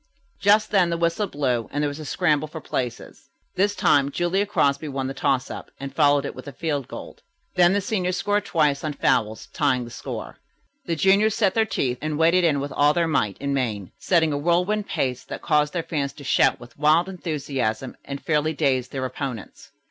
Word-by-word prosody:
Just 210 Hz, +1 st, +4 dB
then 190 Hz, -4 st, +4 dB
the 170 Hz, -, -1 dB
whistle 170 Hz, +5 st, 0 dB
blew, 130 Hz, -8 st, -1 dB
and 145 Hz, +1 st, -1 dB
there -, -, +2 dB
was 145 Hz, +1 st, -5 dB
a 155 Hz, -, -7 dB
scramble 155 Hz, -1 st, +1 dB
for 160 Hz, +1 st, -8 dB
places. 125 Hz, -5 st, -5 dB, 0.2 s
This 200 Hz, +2 st, +1 dB
time 145 Hz, -8 st, +3 dB
Julia 175 Hz, +6 st, 0 dB
Crosby 140 Hz, -6 st, +1 dB
won 135 Hz, -2 st, -3 dB
the 135 Hz, -, -3 dB
toss 135 Hz, -1 st, 0 dB
up, -, -, -8 dB
and 135 Hz, 0 st, -6 dB
followed 145 Hz, 0 st, +4 dB
it -, -, -2 dB
up -, -, -8 dB
with -, -, -10 dB
a -, -, -5 dB
field 145 Hz, -2 st, -2 dB
goal. -, -, -9 dB, 0.3 s
Then 175 Hz, 0 st, +5 dB
the 205 Hz, -, +1 dB
seniors 185 Hz, -3 st, -1 dB
scored 205 Hz, 0 st, 0 dB
twice 150 Hz, -7 st, +1 dB
on 155 Hz, -1 st, -2 dB
fouls, 110 Hz, -5 st, 0 dB
tying 130 Hz, -4 st, +1 dB
the 120 Hz, -, -11 dB
score. -, -, -7 dB, 0.5 s
The 165 Hz, -, -1 dB
juniors 200 Hz, +6 st, +3 dB
set 200 Hz, -5 st, +2 dB
their 220 Hz, -1 st, +2 dB
teeth 125 Hz, -, -1 dB
and 155 Hz, 0 st, -2 dB
waded 170 Hz, +3 st, +4 dB
in 155 Hz, -4 st, +3 dB
with 140 Hz, +1 st, -4 dB
all 145 Hz, +2 st, +3 dB
their 170 Hz, -1 st, +2 dB
might 105 Hz, -, 0 dB
and 140 Hz, 0 st, -2 dB
main, 110 Hz, -8 st, -2 dB
setting 160 Hz, -4 st, +2 dB
a 145 Hz, -, -1 dB
whirlwind 180 Hz, +6 st, +1 dB
pace 130 Hz, -1 st, -2 dB
that -, -, -7 dB
caused 150 Hz, -2 st, +2 dB
their 170 Hz, -2 st, -1 dB
fans 140 Hz, -5 st, -2 dB
to 145 Hz, -, -12 dB
shout -, -, +3 dB
with 120 Hz, +3 st, -14 dB
wild 155 Hz, +4 st, +4 dB
enthusiasm 140 Hz, -, -3 dB
and 140 Hz, 0 st, -6 dB
fairly 155 Hz, 0 st, +1 dB
dazed 130 Hz, -4 st, 0 dB
their 130 Hz, -1 st, -3 dB
opponents. 125 Hz, -4 st, -6 dB
150 Hz, 210 wpm, -24 LUFS, 135-175 Hz, 0.5 s, Then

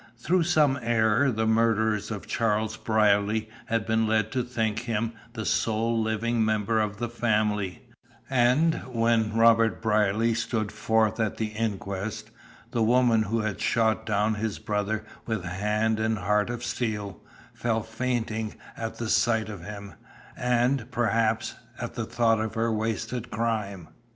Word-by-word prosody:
Through 170 Hz, +8 st, +1 dB
some 150 Hz, -5 st, +3 dB
error 115 Hz, +3 st, +3 dB
the 110 Hz, -2 st, 0 dB
murderers 110 Hz, -1 st, +2 dB
of 105 Hz, -3 st, -5 dB
Charles 110 Hz, -1 st, 0 dB
Brierly 110 Hz, -1 st, +2 dB, 0.2 s
had 115 Hz, -1 st, 0 dB
been 110 Hz, 0 st, +1 dB
led 110 Hz, -1 st, +1 dB
to 130 Hz, -, 0 dB
think 110 Hz, -3 st, -1 dB
him 115 Hz, -1 st, -2 dB, 0.2 s
the 110 Hz, -3 st, -5 dB
sole 115 Hz, +1 st, +1 dB
living 110 Hz, +1 st, 0 dB
member 110 Hz, 0 st, +1 dB
of 105 Hz, -1 st, -2 dB
the 120 Hz, -, -2 dB
family, 105 Hz, -4 st, 0 dB, 0.4 s
and 130 Hz, +6 st, +3 dB
when 115 Hz, -2 st, +2 dB
Robert 115 Hz, 0 st, +4 dB
Brierly 110 Hz, +1 st, +2 dB
stood 110 Hz, -2 st, -2 dB
forth 110 Hz, 0 st, +1 dB
at 110 Hz, -2 st, 0 dB
the 110 Hz, -1 st, -1 dB
inquest, 105 Hz, -2 st, -4 dB, 0.4 s
the 115 Hz, -, 0 dB
woman 120 Hz, 0 st, +4 dB
who 110 Hz, +2 st, 0 dB
had 105 Hz, -2 st, -3 dB
shot 110 Hz, -1 st, +1 dB
down 105 Hz, +1 st, +1 dB
his 105 Hz, 0 st, -3 dB
brother 105 Hz, +1 st, -2 dB, 0.2 s
with 110 Hz, -5 st, -2 dB
hand 105 Hz, +4 st, 0 dB
and 110 Hz, 0 st, 0 dB
heart 105 Hz, +3 st, +1 dB
of 120 Hz, 0 st, -4 dB
steel, 105 Hz, -7 st, -3 dB, 0.3 s
fell 115 Hz, -2 st, -1 dB
fainting 110 Hz, -2 st, -2 dB, 0.2 s
at 115 Hz, 0 st, -5 dB
the 115 Hz, -, -3 dB
sight 110 Hz, -1 st, +2 dB
of 100 Hz, -5 st, -8 dB
him, 100 Hz, 0 st, -8 dB, 0.4 s
and, 125 Hz, 0 st, +1 dB
perhaps, 115 Hz, -1 st, +1 dB, 0.3 s
at 120 Hz, -, -5 dB
the 115 Hz, -, -3 dB
thought 115 Hz, -1 st, +2 dB
of 110 Hz, +1 st, -3 dB
her 115 Hz, 0 st, +1 dB
wasted 110 Hz, +2 st, -2 dB
crime. 105 Hz, -6 st, -2 dB
110 Hz, 150 wpm, -27 LUFS, 105-115 Hz, 0.4 s, Robert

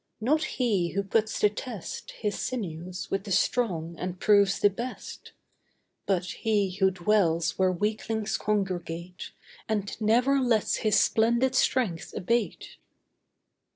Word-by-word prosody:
Not 295 Hz, +8 st, +2 dB
he 205 Hz, -9 st, 0 dB
who 200 Hz, +1 st, 0 dB
puts 215 Hz, +2 st, 0 dB
to 210 Hz, -, +5 dB
test 215 Hz, -3 st, -7 dB
His 210 Hz, -2 st, -2 dB
sinews 180 Hz, -6 st, -5 dB
with 195 Hz, -, -1 dB
the 200 Hz, -, -7 dB
strong 180 Hz, -5 st, 0 dB
and 180 Hz, 0 st, -4 dB
proves 200 Hz, -2 st, +4 dB
the 205 Hz, -, +4 dB
best; 240 Hz, +6 st, -7 dB, 0.7 s
But 185 Hz, -2 st, +1 dB
he 205 Hz, 0 st, 0 dB
who 190 Hz, -1 st, +4 dB
dwells 175 Hz, -3 st, +1 dB
where 185 Hz, -1 st, +4 dB
weaklings 215 Hz, +2 st, -2 dB
congregate, 180 Hz, -4 st, -3 dB, 0.4 s
And 205 Hz, -2 st, -1 dB
never 245 Hz, +6 st, +3 dB
lets 240 Hz, -5 st, +1 dB
his 215 Hz, -1 st, +3 dB
splendid 235 Hz, +3 st, +2 dB
strength 240 Hz, -9 st, 0 dB
abate. 230 Hz, +4 st, -2 dB
205 Hz, 125 wpm, -27 LUFS, 185-225 Hz, 0.7 s, to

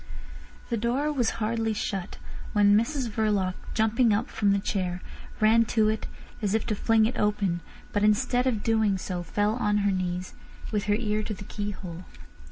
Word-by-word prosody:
The 235 Hz, -, +1 dB
door 250 Hz, +7 st, 0 dB
was 245 Hz, -6 st, 0 dB
hardly 225 Hz, 0 st, 0 dB
shut 195 Hz, -3 st, -3 dB, 0.4 s
when 205 Hz, -1 st, +5 dB
Mrs 245 Hz, +4 st, +1 dB
Verloc, 210 Hz, -4 st, 0 dB, 0.2 s
jumping 225 Hz, +2 st, +3 dB
up 220 Hz, +5 st, -2 dB
from 205 Hz, -2 st, +2 dB
the 200 Hz, -, +3 dB
chair, 185 Hz, -3 st, -2 dB, 0.4 s
ran 220 Hz, +2 st, +5 dB
to 215 Hz, -1 st, +2 dB
it 220 Hz, 0 st, -2 dB, 0.3 s
as 205 Hz, -1 st, +1 dB
if 220 Hz, -, 0 dB
to 215 Hz, -, -1 dB
fling 225 Hz, +1 st, +3 dB
it 235 Hz, -, -2 dB
open, 205 Hz, -4 st, +1 dB, 0.3 s
but 205 Hz, -, +1 dB
instead 245 Hz, +4 st, +2 dB
of 220 Hz, -5 st, 0 dB
doing 220 Hz, -3 st, +2 dB
so 185 Hz, -1 st, -4 dB
fell 205 Hz, +5 st, 0 dB
on 210 Hz, -3 st, +1 dB
her 200 Hz, -, +3 dB
knees, 180 Hz, -1 st, -2 dB, 0.4 s
with 210 Hz, -2 st, -1 dB
her 205 Hz, -1 st, +2 dB
ear 215 Hz, -1 st, 0 dB
to 215 Hz, 0 st, -4 dB
the 195 Hz, -, -9 dB
keyhole. 190 Hz, -5 st, -5 dB
210 Hz, 175 wpm, -27 LUFS, 200-225 Hz, 0.4 s, when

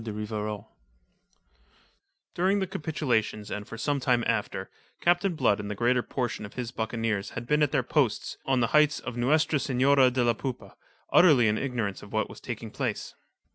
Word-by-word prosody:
DE 110 Hz, -, -5 dB
RIVAROL 105 Hz, -1 st, -4 dB, 1.7 s
During 190 Hz, +3 st, +2 dB
the 195 Hz, -, 0 dB
capitulation 145 Hz, -, -1 dB
and 105 Hz, 0 st, -5 dB
for 115 Hz, -, -8 dB
some 145 Hz, +4 st, 0 dB
time 125 Hz, -3 st, +2 dB
after, -, -, -2 dB, 0.3 s
Captain 175 Hz, +1 st, +2 dB
Blood 105 Hz, -9 st, +2 dB
and 105 Hz, 0 st, -5 dB
the 105 Hz, -, -3 dB
greater 120 Hz, +3 st, +2 dB
portion 120 Hz, -3 st, -3 dB
of 100 Hz, -, -9 dB
his 125 Hz, -2 st, -4 dB
buccaneers 110 Hz, -3 st, -2 dB
had 120 Hz, -, -4 dB
been 150 Hz, +4 st, +2 dB
at 150 Hz, -, +3 dB
their -, -, +1 dB
post -, -, 0 dB
on 130 Hz, -2 st, +1 dB
the 115 Hz, -, +3 dB
heights 150 Hz, -1 st, +4 dB
of -, -, -6 dB
Nuestra 150 Hz, +5 st, +2 dB
Senora 135 Hz, 0 st, +4 dB
de 125 Hz, 0 st, 0 dB
la 120 Hz, -1 st, +3 dB
Poupa, 115 Hz, -4 st, -6 dB, 0.4 s
utterly 145 Hz, -10 st, +6 dB
in 105 Hz, +1 st, +1 dB
ignorance 120 Hz, -7 st, -2 dB
of -, -, -12 dB
what -, -, -1 dB
was -, -, -11 dB
taking -, -, -6 dB
place. -, -, -3 dB
125 Hz, 180 wpm, -27 LUFS, 110-145 Hz, 1.7 s, utterly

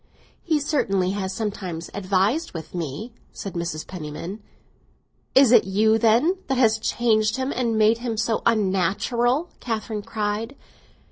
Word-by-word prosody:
"He 315 Hz, -3 st, +1 dB
certainly 195 Hz, -11 st, 0 dB
has 190 Hz, -1 st, -3 dB
sometimes 190 Hz, -5 st, -4 dB
advised 200 Hz, -, 0 dB
with 160 Hz, -, -7 dB
me," 175 Hz, -, -5 dB, 0.2 s
said 195 Hz, -, -7 dB
Mrs. 170 Hz, -3 st, -4 dB
Penniman. 175 Hz, +4 st, -7 dB, 0.9 s
"Is 265 Hz, -3 st, +7 dB
it 235 Hz, -3 st, +6 dB
you, 215 Hz, +3 st, +3 dB
then, 245 Hz, -, +3 dB
that 270 Hz, -, 0 dB
have 220 Hz, -3 st, +3 dB
changed 220 Hz, -2 st, +2 dB
him 260 Hz, +1 st, -1 dB
and 235 Hz, -3 st, 0 dB
made 220 Hz, +1 st, +4 dB
him 235 Hz, -2 st, -3 dB
so 225 Hz, 0 st, 0 dB
unnatural?" 230 Hz, -, +1 dB
Catherine 220 Hz, -2 st, -3 dB
cried. 220 Hz, +3 st, -3 dB
220 Hz, 135 wpm, -23 LUFS, 190-240 Hz, 0.9 s, Is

